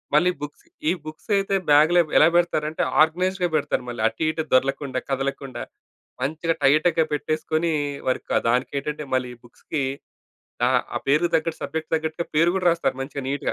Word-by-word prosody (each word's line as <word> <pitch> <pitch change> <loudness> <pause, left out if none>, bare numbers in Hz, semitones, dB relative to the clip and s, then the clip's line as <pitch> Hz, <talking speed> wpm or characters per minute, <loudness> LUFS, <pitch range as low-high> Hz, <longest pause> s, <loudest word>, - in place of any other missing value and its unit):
మళ్ళీ 180 +4 +4
బుక్స్ 145 - -8 0.2
ఈ - - +4
బుక్స్ 155 +7 -10
అయితే, 195 0 0 0.2
బాగ్‌లో 160 +4 +6 0.2
ఎలా 155 - +7
పెడతారంటే 155 -3 0 0.2
ఆర్గనైజ్డ్‌గా 180 +2 0
పెడతారు 125 - 0
మళ్ళీ. 120 -2 -5
అటు 115 +8 -3
ఇటు 160 0 -2
దొర్లకుండా, 135 0 +1
కదలకుండా. 135 -1 -3 0.6
మంచిగా 160 +4 -1
టైట్‌గా 155 +3 +4
పెట్టేసుకొని, 155 +2 -1 0.4
వర్కా - - 0
దానికేంటంటే, 140 +4 -1
మళ్ళీ 125 -1 -1
ఈ - - -23
బుక్స్‌కి 140 +4 -5 0.8
అహా! - - +1
పేరుకి 155 +5 +3
తగ్గట్టు 160 0 0
సబ్జెక్ట్‌కి 160 0 -4
తగ్గట్టుగా 160 +1 -2
పేరు 165 +3 +4
కూడా 180 -2 -1
రాస్తారు 165 -5 0
మంచిగా 135 +1 -5
నీట్‌గా. 140 0 -1
155 Hz, 145 wpm, -23 LUFS, 140-165 Hz, 0.8 s, ఎలా